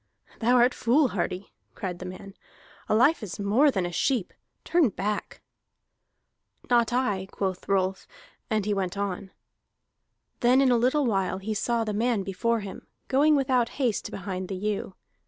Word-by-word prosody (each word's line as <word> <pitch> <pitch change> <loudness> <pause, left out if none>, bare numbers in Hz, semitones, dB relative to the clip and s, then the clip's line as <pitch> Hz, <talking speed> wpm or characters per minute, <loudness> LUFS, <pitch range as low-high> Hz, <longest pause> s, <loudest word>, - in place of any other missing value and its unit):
"Thou 245 +2 +3
art 245 +1 +5
foolhardy," 215 - 0 0.2
cried 180 -3 -5
the 185 - -6
man. 195 +2 -9 0.6
"A - - +3
life 265 +8 +4
is 205 -3 -6
more 215 +9 +4
than 190 -9 0
a 175 - -3
sheep. 235 +3 0 0.3
Turn 335 -7 +3
back!" 205 +1 -4 1.3
"Not 235 -1 +4
I," 210 -7 0
quoth 190 -2 -4
Rolf, 190 -1 0 0.4
and 215 -3 0
he 210 - +1
went 190 -1 -2
on. 195 -1 -3 1.1
Then 250 +2 +4
in 270 -2 +4
a - - +5
little 260 +5 +2
while 195 -5 0
he 205 +3 -3
saw 235 +2 0
the 215 -1 -3
man 225 -1 +1
before 225 +4 -1
him, 200 -1 -9 0.2
going 295 +3 +4
without 255 -4 +2
haste 250 -7 0
behind 185 -1 -5
the 195 - -4
ewe. 200 -1 -3
210 Hz, 155 wpm, -26 LUFS, 195-245 Hz, 1.3 s, art